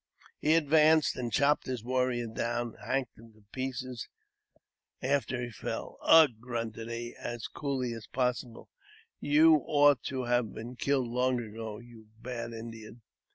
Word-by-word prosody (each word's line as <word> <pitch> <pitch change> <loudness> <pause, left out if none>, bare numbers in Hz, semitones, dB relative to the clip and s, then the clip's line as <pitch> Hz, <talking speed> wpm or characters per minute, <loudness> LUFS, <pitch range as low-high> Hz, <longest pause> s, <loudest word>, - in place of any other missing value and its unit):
He 155 +2 +3
advanced, 155 -1 +4
and 120 -2 -4
chopped 145 +1 +2
his 125 -4 -3
warrior 125 -1 0
down, 120 +1 -2
and - - -12
hacked 130 -4 -2
him 115 0 -15
to 110 -1 -23
pieces 130 -2 -5 0.9
after 130 -1 0
he 120 -1 -4
fell. - - -6
' - - -27
"Ugh! 160 -4 +7
" - - -28
grunted 115 -2 -4
he, 120 0 -5
as 120 -2 -5
coolly 130 -4 -3
as 115 -3 -9
possible, 125 -2 -2 0.3
" - - -30
you 155 +2 +6
ought 145 -2 +5
to 130 -1 -2
have 120 -2 0
been 120 +3 -7
killed 135 -1 0
long 125 +1 +1
ago, 110 -1 -6
you 115 -1 -14
bad 120 -1 -5
Indian 115 0 -9
125 Hz, 160 wpm, -30 LUFS, 115-135 Hz, 0.9 s, Ugh